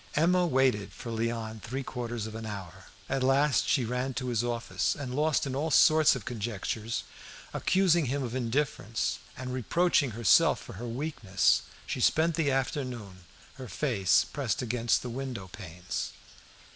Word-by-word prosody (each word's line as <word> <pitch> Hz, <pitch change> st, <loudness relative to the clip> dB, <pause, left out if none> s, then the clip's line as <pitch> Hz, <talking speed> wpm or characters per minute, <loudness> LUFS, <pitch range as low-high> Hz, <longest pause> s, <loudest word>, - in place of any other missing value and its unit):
Emma 180 Hz, +3 st, +3 dB
waited 130 Hz, -8 st, +2 dB
for 115 Hz, -, -8 dB
Léon 115 Hz, -1 st, -3 dB
three 130 Hz, +6 st, -4 dB
quarters 120 Hz, -3 st, -4 dB
of 110 Hz, -, -7 dB
an 115 Hz, 0 st, -6 dB
hour. 100 Hz, -4 st, -7 dB, 0.2 s
At 135 Hz, -, -1 dB
last 135 Hz, +2 st, +3 dB
she 130 Hz, -5 st, +2 dB
ran 125 Hz, +2 st, -2 dB
to 125 Hz, -1 st, -2 dB
his 120 Hz, -1 st, 0 dB
office; 120 Hz, -1 st, -1 dB
and, 135 Hz, -4 st, -5 dB
lost 150 Hz, +2 st, +1 dB
in 135 Hz, -1 st, -3 dB
all 150 Hz, +4 st, -1 dB
sorts 155 Hz, +1 st, +6 dB
of 120 Hz, -6 st, -7 dB
conjectures, 115 Hz, 0 st, -3 dB, 0.5 s
accusing 180 Hz, -4 st, +3 dB
him 140 Hz, +2 st, -1 dB
of 120 Hz, -2 st, -4 dB
indifference, 120 Hz, -3 st, -1 dB, 0.2 s
and 125 Hz, 0 st, -5 dB
reproaching 145 Hz, -, +2 dB
herself 115 Hz, -4 st, +5 dB
for -, -, -10 dB
her 120 Hz, +5 st, -6 dB
weakness, 115 Hz, -, +1 dB, 0.2 s
she -, -, -3 dB
spent 165 Hz, +2 st, +3 dB
the 155 Hz, -3 st, +1 dB
afternoon, 125 Hz, -8 st, -3 dB, 0.3 s
her 130 Hz, -2 st, -7 dB
face 100 Hz, -3 st, +2 dB
pressed 130 Hz, -5 st, -2 dB
against 120 Hz, -1 st, +1 dB
the 125 Hz, -, -4 dB
window 125 Hz, -6 st, -5 dB
panes. 90 Hz, -2 st, -5 dB
125 Hz, 160 wpm, -29 LUFS, 115-140 Hz, 0.5 s, sorts